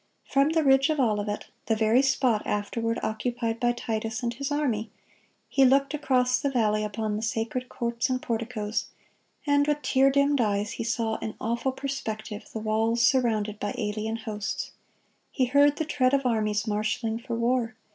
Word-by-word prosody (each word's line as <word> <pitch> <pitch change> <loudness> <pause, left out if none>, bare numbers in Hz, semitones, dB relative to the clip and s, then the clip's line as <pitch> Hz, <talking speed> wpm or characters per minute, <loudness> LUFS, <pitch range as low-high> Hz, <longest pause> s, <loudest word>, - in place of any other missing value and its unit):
From 275 +2 +3
the 320 0 +2
ridge 270 +1 +4
of 305 -2 0
Olivet, 210 -4 0 0.2
the 225 - +2
very 220 +3 +4
spot 260 -5 +2
afterward 230 +3 -1
occupied 230 +1 -2
by 240 0 +2
Titus 225 0 -3
and 235 0 -1
his 280 +4 -4
army, 240 -7 0 0.6
He 270 - +3
looked 275 +2 +4
across 255 -4 +2
the 280 - 0
valley 215 -5 +1
upon 210 0 -2
the - - -4
sacred 230 +3 -2
courts 235 +2 -2
and 255 0 0
porticoes, 225 -2 -3 0.6
and 285 0 +3
with 295 0 0
tear 270 0 +4
dimmed 280 0 +3
eyes 205 -1 0
He - - -4
saw, 225 -1 -1
in 215 - -5
awful 235 +4 -1
perspective, 220 -6 -5
the - - -5
walls 220 +2 +1
surrounded 220 -5 +2
by 205 - -3
alien 215 0 -2
hosts. 215 -2 -4 0.6
He 260 - +1
heard 285 +3 +4
the 315 - -2
tread 280 -3 +2
of 275 -1 -1
armies 215 -2 +1
marshaling 220 +1 -1
for 235 -1 -4
war. 235 -1 0
235 Hz, 170 wpm, -27 LUFS, 220-265 Hz, 0.6 s, ridge